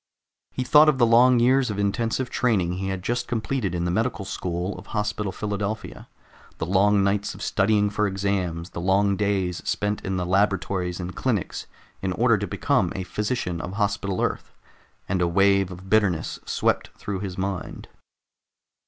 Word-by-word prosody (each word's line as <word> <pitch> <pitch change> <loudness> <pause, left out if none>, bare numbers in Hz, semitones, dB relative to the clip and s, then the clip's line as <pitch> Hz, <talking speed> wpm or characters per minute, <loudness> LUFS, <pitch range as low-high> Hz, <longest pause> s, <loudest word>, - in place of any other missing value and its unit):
He 130 - -3
thought 150 +4 +6
of 145 - +2
the 120 - +5
long 120 +2 +5
years 130 +1 +3
of 105 - -3
intensive 115 +5 -1
training 95 -7 +1
he 95 - -3
had 95 -2 -3
just 120 +3 -1
completed 115 -4 -2
in 85 0 -1
the 90 - 0
medical 110 +1 -1
school 90 +1 -3
of - - -13
Hospital 105 -1 -2
Philadelphia, 105 +1 -4 0.5
the - - -2
long 100 +3 +3
nights 100 +1 0
of - - -8
studying 105 0 +2
for 105 0 +1
exams, 95 -4 -2
the 85 - -5
long 100 +2 +2
days 95 -3 0
spent 105 0 -1
in 95 0 -2
the 90 - -1
laboratories 95 -1 0
and 90 0 -5
clinics 110 -9 -2 0.3
in - - -1
order - - +3
to - - -3
become - - +1
a 95 - -3
physician 100 -4 -2
of 95 - -6
Hospital 100 -2 -1
Earth, - - -3 0.5
and 95 -1 0
a 90 - +3
wave 100 +1 +3
of 90 +1 -10
bitterness 95 -6 +1
swept - - 0
through 100 -2 -4
his 95 -2 -5
mind. 95 -2 -4
100 Hz, 170 wpm, -24 LUFS, 95-105 Hz, 0.5 s, thought